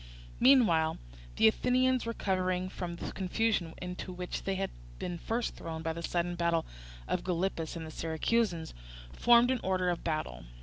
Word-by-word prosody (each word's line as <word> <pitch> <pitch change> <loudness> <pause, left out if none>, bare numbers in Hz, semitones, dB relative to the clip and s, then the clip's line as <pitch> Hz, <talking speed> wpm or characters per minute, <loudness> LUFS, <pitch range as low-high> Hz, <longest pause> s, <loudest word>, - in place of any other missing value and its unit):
Meanwhile 215 -12 +5 0.4
the 220 - +6
Athenians, 255 +2 +2
recovering 185 -4 0
from 175 -2 -5
the - - -5
confusion 190 -3 0
into 180 +1 -5
which 180 0 -5
they 195 - 0
had 195 0 -2 0.3
been 175 - -4
first 230 +5 -2
thrown 160 -1 -6
by 160 -1 -1
the 170 - -6
sudden 175 +1 -1
approach 170 -1 +1 0.4
of - - -1
Gylippus 175 -2 -1
and 165 -1 -5
the 155 - -8
Syracusans, 165 +2 0 0.4
formed 240 +1 +5
in 260 - +1
order 185 -1 +1
of 175 - -4
battle. 155 - -3
180 Hz, 160 wpm, -31 LUFS, 170-225 Hz, 0.4 s, the